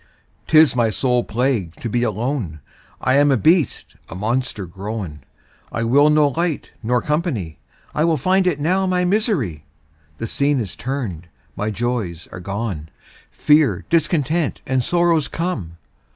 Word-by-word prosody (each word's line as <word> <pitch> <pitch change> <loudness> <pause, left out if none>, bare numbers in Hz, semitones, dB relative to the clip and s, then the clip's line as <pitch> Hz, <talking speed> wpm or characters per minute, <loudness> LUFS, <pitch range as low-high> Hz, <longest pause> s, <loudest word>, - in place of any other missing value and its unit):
'Tis 155 -4 +6
my 120 -2 +3
sole 125 +2 +1
plague 115 -8 -1
to - - -6
be 120 +2 0
alone, 115 - -2 0.4
I 130 +2 +2
am 145 0 +5
a 135 - +4
beast, 160 +5 +1
a - - -7
monster 110 +1 -2
grown, 95 -3 -6 0.5
I 115 - -2
will 140 +6 +5
no 150 -1 +4
light 165 +2 -2
nor 120 +1 0
company, 150 - -2 0.3
I 160 +2 +2
find 185 +6 +2
it 160 -5 +1
now 185 +6 +1
my 180 -1 +1
misery. 175 - 0 0.5
The 115 - -4
scene 140 +4 +1
is 105 -6 -4
turn'd, 115 - -4 0.3
my 105 +2 -2
joys 110 -7 -3
are - - -7
gone, 95 -4 -4 0.4
Fear, 150 -1 +3
discontent, 165 -1 +1
and 130 -1 0
sorrows 170 -1 +2
come. 120 - -4
130 Hz, 145 wpm, -20 LUFS, 105-155 Hz, 0.5 s, Tis